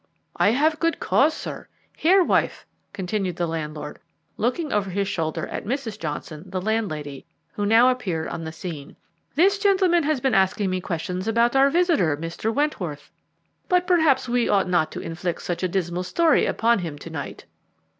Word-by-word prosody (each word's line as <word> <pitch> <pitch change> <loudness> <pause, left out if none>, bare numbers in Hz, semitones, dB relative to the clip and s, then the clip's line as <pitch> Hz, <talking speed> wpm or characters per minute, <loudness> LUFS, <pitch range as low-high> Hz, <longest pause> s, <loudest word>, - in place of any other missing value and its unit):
"I - - +3
have 305 +7 +2
good 330 0 0
cause, 310 +3 +3
sir. - - -7 0.3
Here, 370 +4 +4
wife," - - 0 0.3
continued 190 -2 -2
the 175 - -1
landlord, 150 -2 -5 0.4
looking 265 +7 -1
over 200 -2 0
his 200 +1 -1
shoulder 160 -5 -2
at - - -5
Mrs. 240 -2 -4
Johnson, 155 0 -5
the 185 0 -3
landlady, 180 -10 -3 0.3
who 205 0 -2
now 225 +3 +6
appeared 190 -11 -1
on 165 - -5
the 160 - -5
scene, 160 -3 -8 0.4
"this 390 +6 +4
gentleman 380 -4 +3
has 300 -2 0
been 265 +1 0
asking 190 0 +2
me 185 0 -1
questions 180 +2 -4
about 235 +2 +2
our 270 +1 +5
visitor, 305 - +2
Mr. 165 +7 -3
Wentworth, 215 - -2 0.6
but 360 0 +3
perhaps 315 -8 +3
we 245 -1 +1
ought 195 -2 +3
not 175 -3 +1
to - - -5
inflict 170 +1 -4
such 175 - -3
a 185 - +1
dismal 175 -1 -2
story 315 - +2
upon 235 -1 +2
him 165 -5 -5
to 165 +3 -10
night." 145 -4 -6
200 Hz, 175 wpm, -24 LUFS, 170-275 Hz, 0.6 s, now